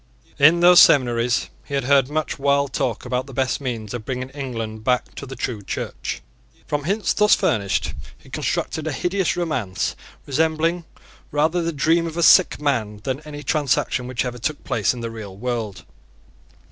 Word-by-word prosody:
In 160 Hz, +5 st, +6 dB
those 175 Hz, 0 st, +8 dB
seminaries 120 Hz, -5 st, +4 dB
he 140 Hz, -, -5 dB
had 135 Hz, -, 0 dB
heard 135 Hz, 0 st, +3 dB
much 155 Hz, 0 st, -2 dB
wild 140 Hz, -1 st, +1 dB
talk 130 Hz, -4 st, -2 dB
about 125 Hz, +1 st, -2 dB
the 135 Hz, -, -10 dB
best 130 Hz, +1 st, 0 dB
means 115 Hz, -6 st, -4 dB
of 120 Hz, -3 st, -5 dB
bringing 130 Hz, +2 st, -4 dB
England 115 Hz, -6 st, -5 dB
back 125 Hz, +1 st, 0 dB
to 140 Hz, -, -8 dB
the 135 Hz, -, -7 dB
true 120 Hz, -3 st, -3 dB
Church. 95 Hz, -, -5 dB, 0.4 s
From 145 Hz, -1 st, -2 dB
hints 200 Hz, +5 st, 0 dB
thus 210 Hz, 0 st, +5 dB
furnished 100 Hz, -3 st, 0 dB, 0.2 s
he -, -, -21 dB
constructed 160 Hz, 0 st, -2 dB
a 160 Hz, -, -1 dB
hideous 180 Hz, +6 st, 0 dB
romance, 130 Hz, -, -2 dB, 0.3 s
resembling 160 Hz, +4 st, 0 dB, 0.4 s
rather 155 Hz, +4 st, +1 dB
the 170 Hz, 0 st, -1 dB
dream 165 Hz, +3 st, +2 dB
of 165 Hz, 0 st, -7 dB
a 170 Hz, -, +1 dB
sick 185 Hz, -, +6 dB
man 115 Hz, -8 st, -1 dB
than 130 Hz, +1 st, -2 dB
any 145 Hz, -1 st, -8 dB
transaction 135 Hz, -3 st, 0 dB
which 130 Hz, 0 st, -2 dB
ever 125 Hz, -1 st, -5 dB
took 150 Hz, +5 st, -3 dB
place 105 Hz, -5 st, +1 dB
in 120 Hz, -, -7 dB
the 115 Hz, -1 st, -4 dB
real 105 Hz, -4 st, -8 dB
world. 115 Hz, -3 st, -4 dB
135 Hz, 175 wpm, -22 LUFS, 120-155 Hz, 0.4 s, those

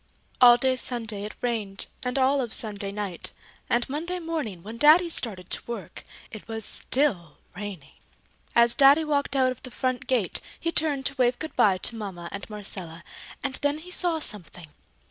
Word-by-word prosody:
All 240 Hz, -1 st, +9 dB
day 260 Hz, +1 st, +1 dB
Sunday 225 Hz, -5 st, -3 dB
it 210 Hz, -, -7 dB
rained 215 Hz, -5 st, -1 dB, 0.2 s
and 250 Hz, 0 st, -1 dB
all 270 Hz, +1 st, +3 dB
of 235 Hz, -3 st, 0 dB
Sunday 205 Hz, -3 st, -3 dB
night, 200 Hz, -4 st, -5 dB, 0.4 s
and 240 Hz, 0 st, +2 dB
Monday 330 Hz, +6 st, -3 dB
morning 310 Hz, -, -4 dB
when 225 Hz, +3 st, -8 dB
Daddy 325 Hz, +4 st, +7 dB
started 190 Hz, -, -3 dB
to -, -, +2 dB
work 200 Hz, -9 st, -7 dB, 0.3 s
it 220 Hz, -, -10 dB
was 225 Hz, -1 st, -3 dB
still 195 Hz, -, 0 dB, 0.2 s
raining. 190 Hz, -7 st, -7 dB, 0.6 s
As 235 Hz, 0 st, +6 dB
Daddy 280 Hz, +3 st, +6 dB
walked 285 Hz, -2 st, 0 dB
out 260 Hz, -1 st, +3 dB
of 255 Hz, -, -8 dB
the 255 Hz, -, -8 dB
front 255 Hz, 0 st, -2 dB
gate, 235 Hz, -9 st, +1 dB, 0.2 s
he 335 Hz, -, -1 dB
turned 295 Hz, -5 st, 0 dB
to 275 Hz, -, -2 dB
wave 245 Hz, 0 st, +3 dB
good 315 Hz, -, -6 dB
bye 195 Hz, -3 st, +4 dB
to 230 Hz, -, -5 dB
Mama 190 Hz, -6 st, -6 dB
and 200 Hz, +2 st, -5 dB
Marcella 190 Hz, -5 st, -6 dB, 0.4 s
and 270 Hz, -2 st, -2 dB
then 290 Hz, +1 st, +1 dB
he 345 Hz, +4 st, -11 dB
saw 350 Hz, -2 st, +1 dB
something. 180 Hz, -, -3 dB
240 Hz, 180 wpm, -26 LUFS, 200-280 Hz, 0.6 s, All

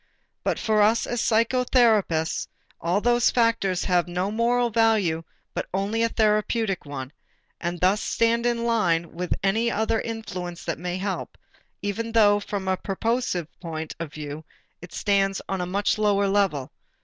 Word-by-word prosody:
But -, -, 0 dB
for 215 Hz, -1 st, +2 dB
us 220 Hz, +2 st, +3 dB
as 240 Hz, -1 st, -2 dB
psychotherapists 225 Hz, -7 st, +2 dB, 0.3 s
all 175 Hz, +5 st, 0 dB
those 240 Hz, +1 st, +3 dB
factors 230 Hz, -6 st, +1 dB
have 180 Hz, -2 st, +2 dB
no 180 Hz, +3 st, -2 dB
moral 235 Hz, +2 st, +1 dB
value 215 Hz, -8 st, +2 dB, 0.3 s
but -, -, -3 dB
only 205 Hz, +4 st, 0 dB
a 230 Hz, -, +3 dB
therapeutic 215 Hz, -3 st, +1 dB
one, 135 Hz, -2 st, -6 dB, 0.5 s
and 175 Hz, 0 st, -3 dB
thus 190 Hz, +4 st, +3 dB
stand 230 Hz, +1 st, +1 dB
in 235 Hz, -1 st, 0 dB
line 175 Hz, -8 st, +1 dB
with 180 Hz, +1 st, -2 dB
any 220 Hz, +4 st, +2 dB
other 220 Hz, 0 st, 0 dB
influence 185 Hz, -6 st, -6 dB
that 165 Hz, -3 st, -3 dB
may 180 Hz, +1 st, -3 dB
help, 195 Hz, 0 st, -4 dB, 0.5 s
even 225 Hz, +3 st, -3 dB
though 205 Hz, -2 st, +5 dB
from 200 Hz, -2 st, -4 dB
a 190 Hz, 0 st, +1 dB
purposive 200 Hz, -4 st, -1 dB
point 160 Hz, -3 st, -5 dB
of 165 Hz, -3 st, -5 dB
view 150 Hz, +1 st, -7 dB, 0.4 s
it 180 Hz, 0 st, -11 dB
stands 195 Hz, +1 st, +1 dB
on 195 Hz, -1 st, -2 dB
a 180 Hz, -, -2 dB
much 200 Hz, +3 st, 0 dB
lower 200 Hz, -1 st, +3 dB
level. 195 Hz, -10 st, +1 dB
200 Hz, 155 wpm, -25 LUFS, 180-225 Hz, 0.5 s, though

